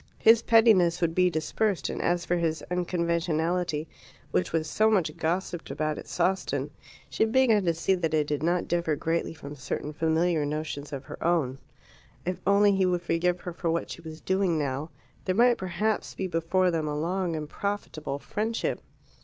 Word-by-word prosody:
His 225 0 +6
pettiness 210 -7 +5
would 165 -2 +1
be 180 +1 +4
dispersed, 180 +5 -1
and - - -4
as 175 0 0
for 175 - +1
his 160 -2 -1
"unconventionality," 170 -2 0 0.4
which 90 - 0
was 160 -1 0
so 215 +7 +3
much 180 -8 +1
gossiped 175 +1 -2
about 155 0 -2
at - - -10
Sawston, 170 -6 -1 0.4
she 140 +8 0
began 225 -3 +3
to 170 - +3
see 165 +4 +1
that 175 -4 0
it 150 -1 +2
did 145 -1 -2
not 175 +2 +1
differ 170 -3 0
greatly 165 +2 -1
from 145 -2 -9
certain 140 +2 -4
familiar 160 +1 +1
notions 150 0 -4
of 140 -2 -5
her - - -8
own. 155 -6 +1 0.7
If 180 +1 -3
only 200 0 +5
he 190 -1 +2
would 180 -1 0
forgive 175 +1 0
her 175 - -6
for 170 0 -2
what 165 +1 -1
she - - -7
was 160 -1 -9
doing 190 -3 +1
now, 145 +1 -2 0.4
there 185 - 0
might 240 +2 +4
perhaps 210 +4 -1
be 190 - -3
before 180 +1 +1
them 160 -2 -1
a 150 0 -2
long 175 +1 -1
and 155 -1 -4
profitable 160 -7 -4
friendship. 220 +9 -2
170 Hz, 180 wpm, -27 LUFS, 155-185 Hz, 0.7 s, His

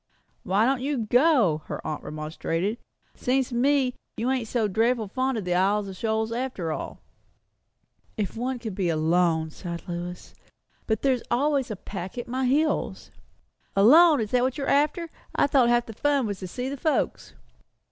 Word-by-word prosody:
"Why 200 +4 +2
don't 265 0 +1
you 265 -4 -1
go?" 240 - +3
her - - -4
aunt 155 - -3
remonstrated. 165 +7 -3 0.3
"Seems 260 0 0
to - - -8
me 265 0 +2 0.2
you 245 +3 0
ain't 255 -4 -1
so 225 -2 0
dreadful 225 +2 +1
fond 260 +4 -1
of 205 - -4
the 180 - 0
Isles 200 +3 +2
of 190 - -7
Shoals 220 +2 -1
after 235 -9 -3
all." - - -6 1.2
"If 210 -2 -2
one 250 +3 -2
could 225 -4 -6
be 185 -2 -1
alone!" 160 0 +1
sighed 170 0 -7
Lois; 175 0 -6 0.5
"but 220 - -1
there 270 -1 +4
is 250 - -4
always 275 +1 +1
a 215 - -3
pack 190 +1 -7
at 240 - -4
my 255 +1 -1
heels." 300 +5 0 0.6
"Alone! 295 - +7
Is 215 - -4
that 250 - +3
what 260 +3 0
you're 280 - -2
after? 305 +4 +1 0.2
I - - +4
thought 270 -4 +3
half 240 0 +3
the 225 - -8
fun 280 +2 +1
was 205 -3 -4
to 185 - -6
see 250 +8 -4
the 280 +1 -4
folks." 310 +3 -1
235 Hz, 180 wpm, -26 LUFS, 190-265 Hz, 1.2 s, Alone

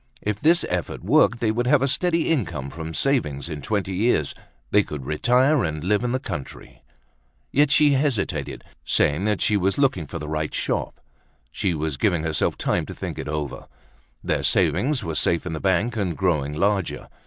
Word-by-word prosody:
If 105 -1 -2
this 170 +5 +4
effort 90 -1 -3
worked, 115 +4 +3
they 110 -2 +2
would 120 +2 -1
have 140 0 +4
a - - +2
steady 170 +3 +1
income 85 - -1
from 80 0 -6
savings 80 - 0
in 75 -3 -6
twenty 100 0 -2
years. 90 - +1 0.4
They - - +5
could 70 -3 -7
retire 125 - +3
and 75 -2 -3
live 105 +5 +1
in 120 - 0
the 130 - 0
country. 65 - -8 0.7
Yet 145 +1 +3
she 145 0 +5
hesitated, 135 -7 -1 0.2
saying 95 +8 +1
she 105 - +2
was 95 0 0
looking 125 - +1
for - - -6
the 75 - -6
right 75 0 -3
shop. - - -2 0.5
She 90 - -1
was 75 -2 -2
giving 90 -5 +1
herself 80 -1 0
time - - -1
to - - -8
think - - -6
it - - -5
over. 75 -2 -4 0.6
Their - - 0
savings 140 +1 +2
were 80 - -3
safe 85 +2 +1
in 90 - -4
the 80 - -4
bank, 100 +6 +1
and 90 -6 -1
growing 75 -6 0
larger. 100 +1 0
95 Hz, 185 wpm, -23 LUFS, 75-125 Hz, 0.7 s, They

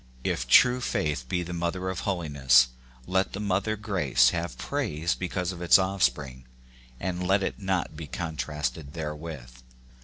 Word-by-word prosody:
If - - -1
true 125 - +6
faith 75 - -2
be 90 +5 0
the 85 +1 -6
mother 85 +2 -2
of 95 -1 -3
holiness, 70 -8 +3 0.4
let 95 +1 0
the 95 - -4
mother 100 +1 0
grace 75 - +2
have 85 -6 -4
praise 80 +3 -1
because 90 0 -3
of 90 -2 -9
its 90 - +7
offspring, 70 -9 -1 0.5
and 90 +3 -3
let 95 +1 +3
it - - -3
not 95 -4 -1
be 75 -1 -7
contrasted 75 -1 -4
therewith. 75 -5 -6
85 Hz, 150 wpm, -27 LUFS, 70-95 Hz, 0.5 s, its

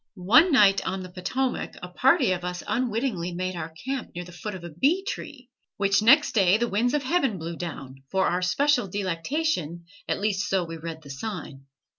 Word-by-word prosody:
One 240 - +5
night 200 -7 +5
on 190 0 -3
the 185 - -10
Potomac 245 +9 -2
a - - -4
party 260 - +3
of 180 -1 -2
us 180 0 -4
unwittingly 230 -8 -1
made 185 +1 -3
our 165 -2 -5 0.2
camp 265 -6 -4
near 175 0 -5
the 180 - -12
foot 200 +4 -6
of 180 - -9
a 170 - -7
bee 300 - +1
tree, 260 -3 -7 0.3
which 200 0 +2
next 275 +8 +6
day 195 -2 +4
the 240 +1 0
winds 235 +6 +1
of 295 - 0
heaven 270 - +1
blew 165 0 -5
down, 135 -6 -7
for 190 0 +1
our 180 +1 0
special 250 +5 +2
delectation, 185 - -2 0.2
at - - 0
least 205 -1 -1
so 190 -2 +1
we 165 -1 -7
read 160 -1 -7
the 140 - -9
sign. 140 -4 -7
195 Hz, 200 wpm, -26 LUFS, 175-250 Hz, 0.3 s, next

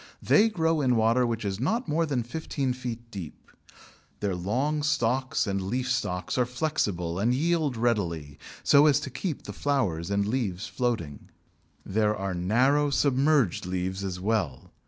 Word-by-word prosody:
They 220 +2 +4
grow 165 -5 +1
in 125 -3 +3
water 115 +2 +3
which 115 -2 -3
is 100 0 -2
not 225 - 0
more 165 +2 +1
than 130 -5 -1
fifteen 135 0 -2
feet 120 -2 -7
deep. 90 -8 -9 0.7
Their 100 -2 -1
long 125 +12 -1
stalks 130 -3 +1
and 100 -2 -1
leaf 125 +7 -2
stalks 90 -4 -1
are 125 - +3
flexible 100 - -1
and 120 +5 +2
yield 155 -3 +1
readily, 85 -11 -1 0.2
so 145 +1 +6
as 145 -1 +4
to 140 - -6
keep 140 +4 -4
the - - -7
flowers 100 - -1
and 100 0 +1
leaves 105 -5 -2
floating. 115 - -3 0.6
There 105 +1 +1
are 95 -2 -3
narrow 125 +11 +2
submerged 140 - +2
leaves 95 +1 -2
as 90 -2 -4
well. 95 - -2
120 Hz, 155 wpm, -27 LUFS, 95-140 Hz, 0.7 s, so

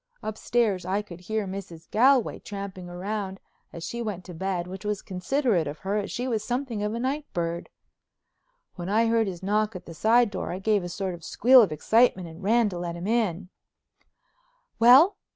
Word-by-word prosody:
Upstairs 215 -3 0
I 195 +4 -1
could 175 -4 -11
hear 215 +3 -2
Mrs. 185 -4 -8
Galway 255 +2 +3
tramping 195 -3 -7
round 195 +2 -4 0.3
as 170 - -8
she 235 +6 -4
went 205 -6 -4
to 180 - -9
bed, 180 0 -2
which 190 +2 -8
was 210 -1 -2
considerate 200 - 0
of 145 +2 -5
her 195 +5 -3
as 205 - -2
she 250 +2 -3
was 225 -4 -1
something 245 -2 -3
of 210 +2 -1
a - - -3
night 280 +4 -3
bird. 170 0 -3 1.1
When 175 +1 -5
I 220 +3 +3
heard 225 -1 +2
his 185 -1 -6
knock 210 +2 0
at 185 - -8
the 165 - -9
side 225 +5 +3
door, 190 - -4
I 180 - -3
gave 205 0 +1
a 175 - -5
sort 185 +1 -3
of 170 -1 -10
squeal 255 +8 +6
of 200 -8 +2
excitement 190 +3 +2
and 165 +2 -11
ran 225 +3 +3
to 180 -3 -6
let 170 -1 -4
him 170 +1 -6
in. 200 -5 0 1.3
"Well?" 265 - +7
200 Hz, 195 wpm, -26 LUFS, 180-230 Hz, 1.3 s, Well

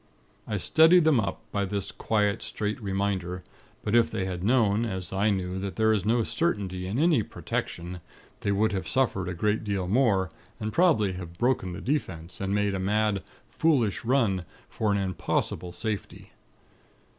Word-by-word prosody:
"I 105 - -1
steadied 160 - +6
them 155 -5 +4
up, 100 - -2
by 100 - 0
this 100 0 -3
quiet, 105 -2 0
straight 105 +2 -3
reminder; 95 -3 -2 0.4
but 105 - -2
if 120 -1 +5
they 95 - -2
had 90 -1 -4
known, 110 -1 +3
as 95 -6 -4
I 100 +3 +2
knew, 95 -2 -1
that 100 0 -4
there 110 0 +3
is 100 -3 0
no 115 +1 +3
certainty 100 - -1
in 100 +5 -2
any 155 -4 +4
'Protection,' 90 -3 -4 0.4
they 100 - -1
would 110 +2 +2
have 95 - -3
suffered 100 -8 +1
a 90 - -4
great 105 +5 0
deal 100 -3 -2
more, 100 -5 +2 0.3
and 110 0 -3
probably 145 - +3
have 85 -2 -8
broken 120 -7 +1
the 95 - -7
'Defense,' 90 - -3
and 100 +1 0
made 105 -1 +1
a 95 - -2
mad, 105 +1 +1 0.3
foolish 125 -10 +1
run 115 -7 +2 0.3
for 110 -2 0
an 100 - +2
impossible 95 -1 -2
safety. 105 +3 -5
100 Hz, 170 wpm, -27 LUFS, 95-115 Hz, 0.4 s, steadied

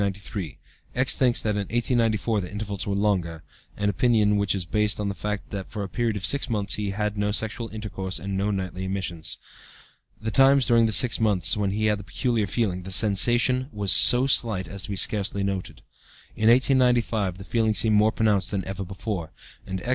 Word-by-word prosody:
X. 130 +1 +4
thinks 125 -3 +2
that 105 - 0
in 105 - -2
1894 115 -2 0
the 90 - -8
intervals 100 -3 -5
were 100 - -1
longer, 90 -6 -1 0.3
an 105 - -1
opinion 105 0 +2
which 100 0 0
is 95 -3 -3
based 105 +1 -1
on 105 -1 -2
the - - -3
fact 105 +3 -5
that 100 0 -6
for 110 -3 -5
a - - -5
period 115 +1 -2
of 95 - -4
six 140 -1 0
months 105 -3 -2
he 105 -1 -1
had 105 +1 -3
no 105 0 0
sexual 110 +2 -2
intercourse 95 -3 -6
and 100 0 -5
no 100 +2 -1
nightly 95 -2 -4
emissions. 95 -4 -3 0.8
The 110 0 -4
times 135 +2 +5
during 115 -2 +3
this 110 - +2
six 125 -4 +4
months 105 -5 +1
when 105 -2 -1
he 105 +2 -2
had 105 -1 +1
the - - -9
'peculiar 115 0 -2
feeling,' 95 -5 -2
the 95 +1 -9
sensation 120 +6 +3
was 100 -3 0
so 120 +9 +6
slight 110 -8 +1
as 100 +2 -6
to - - -12
be 100 - -3
scarcely 100 +1 0
noted. 100 -2 -5 0.5
In 110 +1 +2
1895, 120 -6 +2
the 95 - -10
feeling 110 0 0
seemed 110 0 +2
more 105 +1 +4
pronounced 105 -3 0
than 100 -2 -3
ever 95 +1 -5
before, 95 -3 -6 0.4
and 95 -1 -5
X. 120 - -6
105 Hz, 200 wpm, -24 LUFS, 95-115 Hz, 0.8 s, so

